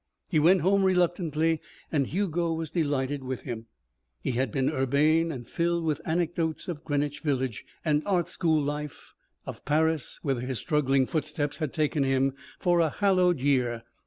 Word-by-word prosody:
He -, -, +3 dB
went 175 Hz, +4 st, +5 dB
home 195 Hz, +4 st, +3 dB
reluctantly 170 Hz, -4 st, +1 dB, 0.3 s
and 140 Hz, -4 st, +1 dB
Hugo 175 Hz, -3 st, 0 dB
was 160 Hz, -2 st, -4 dB
delighted 145 Hz, -4 st, -1 dB
with 130 Hz, -1 st, -4 dB
him. 115 Hz, -3 st, -6 dB, 0.6 s
He -, -, 0 dB
had 125 Hz, -1 st, 0 dB
been 130 Hz, +2 st, 0 dB
urbane 155 Hz, +5 st, +2 dB
and 120 Hz, -5 st, -7 dB
filled 170 Hz, +2 st, 0 dB
with 155 Hz, -1 st, -1 dB
anecdotes 165 Hz, -1 st, -1 dB
of 165 Hz, -5 st, -5 dB
Greenwich 145 Hz, -1 st, -1 dB
Village 130 Hz, -7 st, -1 dB, 0.2 s
and 150 Hz, -1 st, +2 dB
art 180 Hz, -4 st, +2 dB
school 160 Hz, -3 st, +1 dB
life, 150 Hz, 0 st, -4 dB, 0.3 s
of -, -, -8 dB
Paris, 155 Hz, -1 st, 0 dB
whither 135 Hz, -5 st, 0 dB
his 125 Hz, 0 st, -3 dB
struggling 135 Hz, -3 st, +2 dB
footsteps 150 Hz, 0 st, -2 dB
had 155 Hz, -4 st, -2 dB
taken 150 Hz, -1 st, 0 dB
him 135 Hz, 0 st, +2 dB, 0.2 s
for 175 Hz, -1 st, +2 dB
a 165 Hz, -2 st, +3 dB
hallowed 185 Hz, -3 st, +2 dB
year. 125 Hz, -4 st, +1 dB
150 Hz, 160 wpm, -27 LUFS, 135-165 Hz, 0.6 s, went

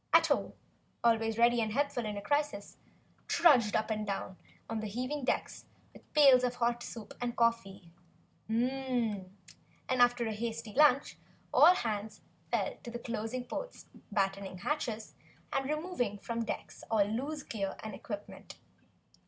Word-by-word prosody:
Ato, -, -, +3 dB, 0.5 s
always 225 Hz, -1 st, +2 dB
ready 235 Hz, 0 st, +4 dB
and 215 Hz, -1 st, -1 dB
helpful 275 Hz, -3 st, 0 dB
in 210 Hz, -1 st, -4 dB
a 200 Hz, -, -5 dB
crisis, 290 Hz, -5 st, -1 dB, 0.5 s
trudged 255 Hz, -11 st, +5 dB
up 220 Hz, 0 st, 0 dB
and 215 Hz, -1 st, -2 dB
down 195 Hz, -1 st, -3 dB, 0.3 s
the 220 Hz, -1 st, -3 dB
heaving 255 Hz, +7 st, -3 dB
decks -, -, -2 dB, 0.3 s
with -, -, -18 dB
pails 275 Hz, -4 st, +7 dB
of 250 Hz, 0 st, 0 dB
hot 240 Hz, 0 st, 0 dB
soup 225 Hz, -3 st, -8 dB
and 240 Hz, -1 st, -2 dB
coffee, 200 Hz, -6 st, 0 dB, 0.6 s
and 245 Hz, -3 st, 0 dB, 0.7 s
after 245 Hz, -1 st, +3 dB
a 220 Hz, -, -1 dB
hasty 225 Hz, 0 st, -4 dB
lunch, 285 Hz, -1 st, +4 dB, 0.3 s
all 360 Hz, -, +8 dB
hands 215 Hz, -, -3 dB, 0.3 s
fell -, -, 0 dB
to 240 Hz, 0 st, -6 dB
closing 235 Hz, +1 st, -4 dB
ports, -, -, -6 dB, 0.3 s
battening 195 Hz, -2 st, -1 dB
hatches 225 Hz, -1 st, -3 dB, 0.4 s
and 270 Hz, 0 st, 0 dB
removing 305 Hz, -, -1 dB
from 230 Hz, +3 st, -4 dB
the 230 Hz, -, -1 dB
decks -, -, -5 dB
all 215 Hz, -3 st, +3 dB
loose 275 Hz, +8 st, -3 dB
gear 195 Hz, -4 st, -3 dB
and 215 Hz, -1 st, -5 dB
equipment. 205 Hz, 0 st, -8 dB
235 Hz, 140 wpm, -32 LUFS, 215-255 Hz, 0.7 s, all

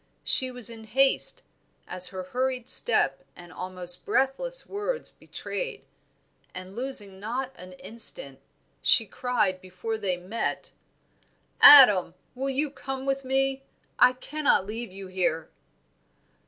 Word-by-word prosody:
She 260 Hz, -, +2 dB
was 245 Hz, -2 st, +2 dB
in 225 Hz, -1 st, -11 dB
haste, 270 Hz, -, +1 dB, 0.4 s
as 180 Hz, 0 st, +4 dB
her 185 Hz, -1 st, -5 dB
hurried 255 Hz, +4 st, -3 dB
step 215 Hz, -, +2 dB
and 175 Hz, 0 st, -13 dB
almost 180 Hz, -1 st, -3 dB
breathless 270 Hz, -, -1 dB
words 415 Hz, +5 st, -5 dB
betrayed; -, -, -7 dB, 0.7 s
and 185 Hz, +1 st, -9 dB
losing 220 Hz, -7 st, -3 dB
not 250 Hz, +6 st, -4 dB
an 185 Hz, 0 st, -12 dB
instant, 230 Hz, -, -3 dB, 0.4 s
she 225 Hz, -, +4 dB
cried 205 Hz, -5 st, -2 dB
before 185 Hz, +5 st, -6 dB
they 185 Hz, -4 st, -2 dB
met 190 Hz, +6 st, -5 dB, 0.9 s
"Adam, 210 Hz, -12 st, +9 dB, 0.2 s
you 255 Hz, -, -12 dB, 0.3 s
will -, -, -14 dB
come 270 Hz, -1 st, -7 dB
with 275 Hz, 0 st, -2 dB
me? 270 Hz, +1 st, -1 dB, 0.4 s
I 250 Hz, -, +6 dB
cannot 280 Hz, -5 st, -1 dB
leave 225 Hz, +1 st, -7 dB
you 195 Hz, +1 st, -10 dB
here." 175 Hz, -4 st, -3 dB
230 Hz, 125 wpm, -26 LUFS, 185-265 Hz, 0.9 s, Adam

